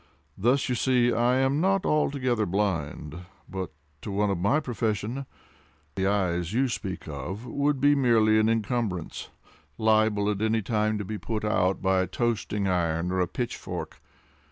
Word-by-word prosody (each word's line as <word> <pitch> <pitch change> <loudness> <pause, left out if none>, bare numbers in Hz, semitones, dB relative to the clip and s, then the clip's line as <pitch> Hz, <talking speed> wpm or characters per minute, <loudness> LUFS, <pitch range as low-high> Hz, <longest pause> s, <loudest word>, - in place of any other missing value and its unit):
Thus 125 +7 +2
you 125 - 0
see 125 -1 +2
I 120 +2 +2
am 135 +3 +2
not 195 +1 +2
altogether 130 -7 +1
blind; 85 -5 -2 0.3
but 95 -3 -5 0.3
to - - -6
one 100 +1 +1
of 95 - -1
my 105 - +3
profession, 115 +1 -2 0.7
the 95 0 0
eyes 90 -3 0
you 130 +2 +2
speak 95 -5 -5
of 85 - -6
would 140 +3 0
be 145 +2 +5
merely 115 -5 +4
an 110 +1 +3
incumbrance, 110 -5 -2 0.5
liable 110 -2 +3
at 100 0 -3
any 110 0 +1
time 110 0 0
to 105 - -4
be 105 +2 -5
put 110 -2 -3
out 95 -3 +1
by 95 -1 +3
a 95 - -1
toasting 105 -1 -1
iron, 85 -1 0
or 95 - 0
a 90 - +2
pitchfork. 120 +5 -5
110 Hz, 160 wpm, -27 LUFS, 95-120 Hz, 0.7 s, be